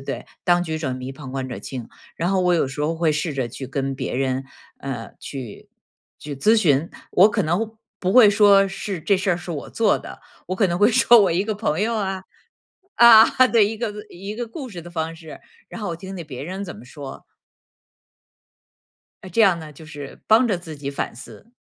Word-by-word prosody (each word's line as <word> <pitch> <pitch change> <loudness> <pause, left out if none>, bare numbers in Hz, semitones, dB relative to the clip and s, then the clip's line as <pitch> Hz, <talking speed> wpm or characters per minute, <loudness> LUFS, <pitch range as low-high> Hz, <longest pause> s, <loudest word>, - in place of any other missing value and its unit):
对， 135 -3 -6 0.2
当 175 -1 +3
局 160 -2 -3
者 130 -5 -3
迷， 130 +1 -6
旁 135 -2 -10
观 130 -1 -4
者 125 - -6
清。 125 -4 -7 0.3
然 170 +3 -1
后 190 -1 +2
我 180 -1 +3
有 160 - +2
时 135 +3 -7
候 155 +3 0
会 160 -2 +2
试 150 0 -2
着 130 -3 -1
去 130 +2 -7
跟 135 0 -3
别 130 - -4
人 130 0 -1 0.3
呃， 130 -4 -6
去 130 -6 -8 0.5
去 145 -1 -7
咨 215 +12 +3
询。 160 -6 +2 0.2
我 200 +4 +6
可 205 - 0
能 215 +8 -1 0.2
不 185 0 0
会 235 -4 +8
说 200 -1 +5
是 195 -2 -5
这 200 +4 +2
事 190 0 -1
儿 170 - +2
是 175 0 -8
我 145 - -6
做 225 - +2
的， - - -11 0.3
我 185 - -3
可 200 - +3
能 175 0 -2
会 210 +4 +5
说 240 -1 +6
我 195 - +2
一 180 +4 +1
个 215 0 -2
朋 200 -5 -1
友 230 +2 0
啊， 195 -3 -2 0.7
啊， 235 +2 +7
对， 230 -4 +4
一 220 0 -5
个 225 -3 -3 0.2
一 195 +4 -7
个 240 0 -4
故 260 +3 -7
事 180 -7 -8
的 175 - -11
方 165 -1 -3
式， 160 -2 -11 0.3
然 - - -8
后 205 - -3
我 170 - -3
听 190 +3 -9
听 170 -3 -7
别 135 -2 -7
人 190 +4 -5
怎 175 - -8
么 - - -13
说。 135 +2 -10 2.0
呃， 185 - -10
这 225 - +1
样 190 -5 +5
呢 155 -1 -10
就 155 +2 -14
是 145 -3 -9
帮 225 +3 +5
着 195 - 0
自 160 -3 -9
己 140 0 -5
反 140 - -4
思。 120 - -13
175 Hz, 235 characters per minute, -22 LUFS, 140-205 Hz, 2.0 s, 会